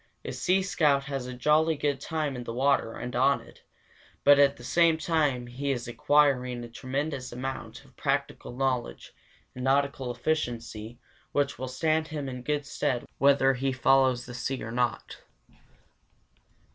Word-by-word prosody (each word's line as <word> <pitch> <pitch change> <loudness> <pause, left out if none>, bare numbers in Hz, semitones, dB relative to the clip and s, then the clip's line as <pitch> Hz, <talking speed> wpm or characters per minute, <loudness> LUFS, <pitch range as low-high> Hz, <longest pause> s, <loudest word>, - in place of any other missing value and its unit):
A - - -3
sea 190 +1 +1
scout 150 -7 +2
has 135 -3 -4
a 125 - -6
jolly 155 +5 +3
good 145 -2 -1
time 155 -2 -2
in 125 - -5
the 115 -1 -6
water 135 -3 +2
and 125 0 -6
on 135 +3 +3
it, - - -17 0.6
but 145 0 +7
at 140 0 +4
the 120 - -12
same 165 +5 +3
time 150 -6 0
he 130 +4 -4
is 125 -3 -2
acquiring 125 -2 +2
a - - -7
tremendous 135 +2 -4
amount 130 +2 -6
of - - -22
practical - - -2
knowledge 130 -1 -2 0.4
and 125 - -7
nautical 135 -1 +1
efficiency 120 -4 -3 0.4
which 145 -2 0
will 130 - -3
stand 155 +4 0
him 150 -3 -5
in 125 -1 -6
good 145 +2 -2
stead 130 -4 -2
whether 135 -1 +5
he 135 +1 -1
follows 130 -1 +3
the 120 - -9
sea 130 +1 -3
or 115 - -6
not. 125 0 -2
135 Hz, 160 wpm, -28 LUFS, 125-145 Hz, 0.6 s, but